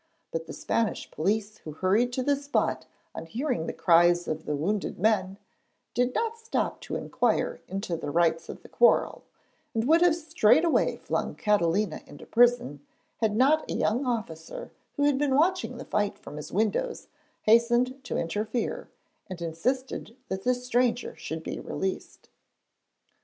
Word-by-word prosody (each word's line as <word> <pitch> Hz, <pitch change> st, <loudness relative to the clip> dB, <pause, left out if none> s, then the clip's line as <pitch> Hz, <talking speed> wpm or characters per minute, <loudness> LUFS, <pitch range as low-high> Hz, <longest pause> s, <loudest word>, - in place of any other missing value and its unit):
But 485 Hz, 0 st, -4 dB
the -, -, -7 dB
Spanish 225 Hz, -2 st, -1 dB
police 205 Hz, +6 st, -1 dB
who 155 Hz, -, -8 dB
hurried 200 Hz, +9 st, +2 dB
to 255 Hz, -, -1 dB
the 285 Hz, +2 st, +3 dB
spot 285 Hz, +1 st, -1 dB, 0.3 s
on 165 Hz, -, -7 dB
hearing 240 Hz, -, -2 dB
the -, -, -1 dB
cries 175 Hz, 0 st, +4 dB
of 155 Hz, 0 st, -4 dB
the 150 Hz, -, 0 dB
wounded 195 Hz, +8 st, -2 dB
men, 195 Hz, -1 st, +1 dB, 0.6 s
did 250 Hz, +1 st, +1 dB
not 460 Hz, 0 st, -1 dB
stop 455 Hz, 0 st, -2 dB
to -, -, -5 dB
inquire -, -, 0 dB
into 195 Hz, -2 st, -3 dB
the 160 Hz, -, -5 dB
rights 165 Hz, +1 st, +1 dB
of -, -, -8 dB
the -, -, -12 dB
quarrel, 485 Hz, -, +3 dB, 0.5 s
and 225 Hz, +2 st, 0 dB
would 325 Hz, +3 st, +5 dB
have 350 Hz, -2 st, +5 dB
straightway 320 Hz, -1 st, +3 dB
flung -, -, -2 dB
Catalina 205 Hz, -3 st, +1 dB
into 145 Hz, -, -12 dB
prison, 235 Hz, -, +2 dB, 0.3 s
had 220 Hz, -2 st, 0 dB
not 285 Hz, +6 st, +3 dB
a -, -, -2 dB
young 240 Hz, +6 st, +1 dB
officer 225 Hz, -, -4 dB, 0.2 s
who 285 Hz, -, 0 dB
had 285 Hz, -2 st, +3 dB
been 285 Hz, -2 st, +2 dB
watching 355 Hz, +5 st, +1 dB
the -, -, -8 dB
fight 205 Hz, -1 st, -1 dB
from 150 Hz, -, -10 dB
his 150 Hz, -, -7 dB
windows 220 Hz, -, -1 dB, 0.4 s
hastened 240 Hz, +4 st, +3 dB
to -, -, -2 dB
interfere, 215 Hz, -, -2 dB, 0.4 s
and 185 Hz, -2 st, -6 dB
insisted 230 Hz, +8 st, -3 dB
that 190 Hz, 0 st, -3 dB
the 250 Hz, +4 st, +2 dB
stranger 245 Hz, -1 st, 0 dB
should 160 Hz, 0 st, -6 dB
be -, -, -5 dB
released. 190 Hz, 0 st, -5 dB
225 Hz, 160 wpm, -27 LUFS, 175-265 Hz, 0.6 s, would